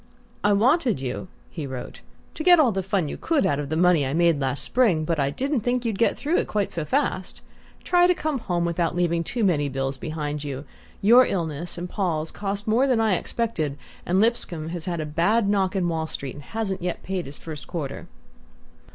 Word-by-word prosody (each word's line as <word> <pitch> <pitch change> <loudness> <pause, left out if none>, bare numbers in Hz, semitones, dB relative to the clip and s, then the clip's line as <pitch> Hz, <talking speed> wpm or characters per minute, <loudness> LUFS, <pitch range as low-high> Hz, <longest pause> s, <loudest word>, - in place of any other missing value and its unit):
"I 205 - +4
wanted 245 - +3
you," 130 +6 -4 0.2
he 155 -5 -5
wrote, 130 -2 -7 0.3
"to 310 - -5
get 350 -1 +7
all 270 -7 +5
the 190 -1 -1
fun 190 -3 0
you - - -5
could 320 -4 +1
out 140 - +1
of 145 -1 -4
the 160 - -1
money 175 -3 +4
I 135 +2 -1
made 170 -3 +3
last 135 0 -1
spring; 195 -12 +2
but 165 -1 0
I 140 -1 +2
didn't 270 - -1
think 245 +2 0
you'd 220 -4 -1
get 230 - +2
through 310 +5 0
it - - 0
quite 205 -2 -1
so 165 - -3
fast. 260 - -1 0.4
Try 355 0 +4
to 360 - +3
come 305 -4 -2
home 175 -5 -1
without 170 0 0
leaving 170 -1 +1
too 235 +7 -2
many 150 -7 +2
bills 135 0 -2
behind 150 0 -4
you. 140 0 -5 0.4
Your 240 +5 +7
illness 165 -2 -3
and 175 +1 -4
Paul's 165 -5 -2
cost 200 0 -4
more 240 +5 +3
than 250 -4 +2
I 220 -3 +3
expected, 165 -9 -2 0.3
and 180 +2 +1
Lipscomb 190 -8 0
has 170 -1 -5
had 175 -2 -2
a 155 - -2
bad 175 +9 +2
knock 195 -2 +1
in 185 -2 +1
Wall 160 -1 -1
Street, 140 -4 -5
and 145 -1 -11
hasn't 205 -4 -3
yet 175 0 -3
paid 185 -5 -3
his 140 - -8
first 155 -3 -8
quarter..." 155 -6 -5
175 Hz, 215 wpm, -24 LUFS, 155-225 Hz, 0.4 s, get